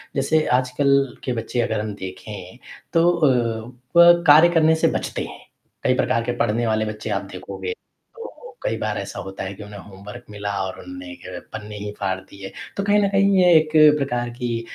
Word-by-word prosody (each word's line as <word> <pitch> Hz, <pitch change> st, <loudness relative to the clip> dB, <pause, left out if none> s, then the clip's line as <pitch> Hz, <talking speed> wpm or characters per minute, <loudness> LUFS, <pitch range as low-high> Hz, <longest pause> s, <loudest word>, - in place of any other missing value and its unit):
जैसे 155 Hz, +3 st, +2 dB
आजकल 135 Hz, 0 st, +1 dB
के 125 Hz, -, -2 dB
बच्चे 120 Hz, +1 st, -2 dB
अगर -, -, -1 dB
हम 105 Hz, -1 st, -4 dB
देखें, 95 Hz, +2 st, -9 dB, 0.4 s
तो 170 Hz, +1 st, +4 dB
अ, 120 Hz, -8 st, 0 dB, 0.2 s
वह 170 Hz, 0 st, +9 dB
कार्य 155 Hz, +4 st, +8 dB
करने 160 Hz, -1 st, +4 dB
से 160 Hz, -, +2 dB
बचते -, -, -4 dB
हैं, -, -, -12 dB, 0.4 s
कई -, -, +3 dB
प्रकार 115 Hz, -, +1 dB
के 120 Hz, -, -2 dB
पढ़ने 115 Hz, +1 st, 0 dB
वाले 110 Hz, 0 st, +1 dB
बच्चे 105 Hz, 0 st, -6 dB
आप -, -, -1 dB
देखोगे, 450 Hz, -, -6 dB
तो 470 Hz, +1 st, -14 dB
कई -, -, -1 dB
बार -, -, -2 dB
ऐसा -, -, -6 dB
होता 95 Hz, 0 st, -7 dB
है 95 Hz, +1 st, -5 dB
कि 105 Hz, -, -10 dB
उन्हें 105 Hz, 0 st, -10 dB
होमवर्क 105 Hz, +5 st, -11 dB
मिला 105 Hz, -1 st, -5 dB
और 95 Hz, -, -6 dB
उन्होंने 275 Hz, -, -9 dB
पन्ने 105 Hz, -1 st, -7 dB
ही 105 Hz, 0 st, -5 dB
फाड़ 95 Hz, -1 st, -1 dB
दिए, 95 Hz, +1 st, -11 dB, 0.3 s
तो 200 Hz, -, -1 dB
कहीं 205 Hz, +1 st, +3 dB
न -, -, +3 dB
कहीं 195 Hz, 0 st, +3 dB
ये 180 Hz, -1 st, +5 dB
एक 155 Hz, 0 st, +2 dB, 0.3 s
प्रकार 125 Hz, -4 st, -2 dB
की 120 Hz, -1 st, -3 dB
120 Hz, 190 wpm, -22 LUFS, 105-160 Hz, 0.4 s, वह